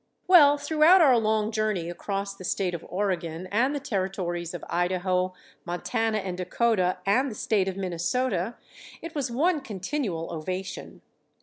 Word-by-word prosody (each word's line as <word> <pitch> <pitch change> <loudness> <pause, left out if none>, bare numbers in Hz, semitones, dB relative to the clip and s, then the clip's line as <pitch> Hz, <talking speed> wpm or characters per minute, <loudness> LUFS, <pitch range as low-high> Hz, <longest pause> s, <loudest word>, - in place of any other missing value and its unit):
Well, 295 -6 +7
throughout 315 +5 +5
our 275 -6 +6
long 215 0 +1
journey 215 -6 -1
across 195 +3 -4
the 195 - -12
State 185 0 -1
of 170 - -5
Oregon 180 -3 -2
and 255 +7 +2
the - - -1
Territories 185 -7 -3
of - - -7
Idaho, 185 +1 0 0.3
Montana 220 +5 -1
and 190 -3 -3
Dakota, 185 0 +1
and 255 +8 +2
the 220 - -7
State 205 -3 +1
of 190 0 -3
Minnesota, 190 +3 -1 0.5
it 330 -1 -7
was 280 -4 -2
one 300 +6 +1
continual 205 - -3
ovation. 185 +4 -6
195 Hz, 145 wpm, -26 LUFS, 180-245 Hz, 0.5 s, Well